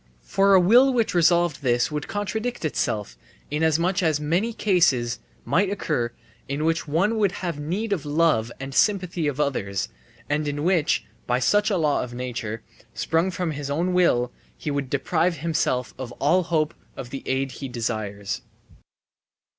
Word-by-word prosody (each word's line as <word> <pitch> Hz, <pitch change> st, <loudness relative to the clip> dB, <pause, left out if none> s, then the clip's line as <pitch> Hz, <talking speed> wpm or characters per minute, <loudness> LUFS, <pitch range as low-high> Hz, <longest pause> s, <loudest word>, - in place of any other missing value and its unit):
For 195 Hz, 0 st, +4 dB
a -, -, +8 dB
will 240 Hz, +9 st, +6 dB
which 235 Hz, -3 st, +1 dB
resolved 170 Hz, -2 st, +3 dB
this 120 Hz, 0 st, +1 dB
would 150 Hz, -1 st, -3 dB
contradict 210 Hz, +1 st, -3 dB
itself, 105 Hz, -, -1 dB, 0.4 s
inasmuch 160 Hz, +5 st, +2 dB
as 160 Hz, -4 st, +2 dB
many 170 Hz, +10 st, 0 dB
cases 165 Hz, -, +2 dB, 0.3 s
might 190 Hz, +2 st, +2 dB
occur 120 Hz, -12 st, -1 dB, 0.4 s
in 140 Hz, +3 st, -2 dB
which 165 Hz, 0 st, 0 dB
one 190 Hz, +9 st, +1 dB
would 200 Hz, -3 st, +2 dB
have 165 Hz, -4 st, -3 dB
need 195 Hz, +9 st, -2 dB
of 185 Hz, -, -1 dB
the 145 Hz, -, -7 dB
love 150 Hz, -7 st, +2 dB
and 135 Hz, 0 st, -6 dB
sympathy 180 Hz, -3 st, +2 dB
of 145 Hz, -1 st, -2 dB
others, 100 Hz, -10 st, -1 dB, 0.4 s
and 150 Hz, +1 st, 0 dB
in 145 Hz, 0 st, -2 dB
which, 175 Hz, -3 st, +2 dB, 0.2 s
by 125 Hz, -, +2 dB
such 205 Hz, -, +3 dB
a 200 Hz, -, +1 dB
law 150 Hz, -4 st, +2 dB
of 120 Hz, -1 st, -6 dB
nature, 115 Hz, -3 st, -4 dB, 0.3 s
sprung 165 Hz, +3 st, +1 dB
from 180 Hz, -2 st, -2 dB
his 145 Hz, -1 st, -5 dB
own 170 Hz, +6 st, 0 dB
will, 125 Hz, -9 st, +3 dB, 0.3 s
he 150 Hz, -, -3 dB
would 140 Hz, -2 st, -2 dB
deprive 165 Hz, +5 st, +1 dB
himself 130 Hz, -7 st, -1 dB
of 130 Hz, -2 st, -5 dB
all 175 Hz, +6 st, +2 dB
hope 160 Hz, -2 st, 0 dB, 0.2 s
of 125 Hz, -3 st, -7 dB
the 135 Hz, -, -5 dB
aid 135 Hz, 0 st, 0 dB
he 135 Hz, -, -6 dB
desires. 110 Hz, -4 st, -3 dB
155 Hz, 165 wpm, -24 LUFS, 130-180 Hz, 0.4 s, a